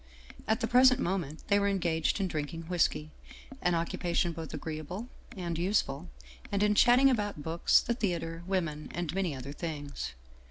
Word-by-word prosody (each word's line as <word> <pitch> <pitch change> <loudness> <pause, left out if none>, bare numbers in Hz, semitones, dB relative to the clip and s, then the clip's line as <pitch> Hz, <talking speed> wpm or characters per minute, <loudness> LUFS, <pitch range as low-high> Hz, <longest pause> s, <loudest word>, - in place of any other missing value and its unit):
At 220 +3 +1
the 225 - +1
present 255 +2 +6
moment 175 - -2
they 200 -1 +4
were 200 - +2
engaged 175 -3 +1
in 195 - +1
drinking 160 0 -4
whisky, 160 -3 0 0.5
an 180 -1 +2
occupation 170 +1 0
both 160 -1 -7
agreeable 160 - -5 0.3
and 170 -2 -3
use 195 +5 +3
ful, 140 +6 -7 0.4
and 200 0 +1
in 210 0 +4
chatting 245 +5 +6
about 205 - -2
books, 165 +2 +3
the 235 - -1
theater, 170 -7 -2
women 165 -6 -2
and 175 -2 -2
many 185 -6 -1
other 135 +2 -7
things. 145 - -5
175 Hz, 165 wpm, -30 LUFS, 160-200 Hz, 0.5 s, present